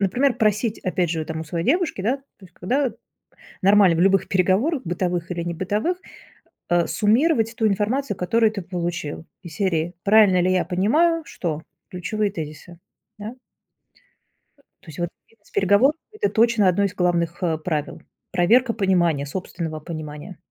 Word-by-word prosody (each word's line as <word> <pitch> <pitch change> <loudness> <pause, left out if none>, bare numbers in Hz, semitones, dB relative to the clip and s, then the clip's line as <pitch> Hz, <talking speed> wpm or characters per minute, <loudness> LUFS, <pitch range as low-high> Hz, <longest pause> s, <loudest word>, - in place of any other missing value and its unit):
например, 245 +7 +2
просить, 215 +1 +1
опять 180 -2 -1
же, 165 - -1
от 155 - -10
там 160 -1 -4
у - - -5
своей 165 +2 -3
девушки, 325 - +1
да, 240 +7 +1
то - - -26 0.2
есть, 185 -2 -16
когда 255 +6 0 0.7
нормально 195 -3 +5
в - - 0
любых 195 +1 +3
переговорах, 200 - +1
бытовых 175 0 -2
или 175 -1 -3
небытовых, 200 - -2 0.7
э, 175 -1 +3
суммировать 225 +1 +2
ту 220 - +1
информацию, 210 +3 0
которую 220 +5 +2
ты 200 -4 -5
получил. 170 -3 -4 0.2
Из 170 -4 -10
серии: 175 -2 -1
"Правильно 205 -3 +5
ли 185 +1 +2
я 180 -2 +2
понимаю, 290 - +2
что"- 160 -3 -4 0.3
ключевые 205 +3 -2
тезисы, 160 0 -8 0.4
да. 215 +3 -7 1.5
То - - -23
есть, 155 +3 -10
вот, 175 - -1 0.2
бизнес-переговорах 205 +5 +2 0.2
это 425 -1 -1
точно 230 -3 +3
одно 185 +2 +2
из 195 -2 0
главных, 175 -1 0
э, 165 -2 +1
правил. 155 -2 -3 0.3
Проверка 230 +7 +3
понимания, 175 -8 +1
собственного 160 0 -5
понимания. 155 +2 -8
185 Hz, 150 wpm, -22 LUFS, 170-220 Hz, 1.5 s, нормально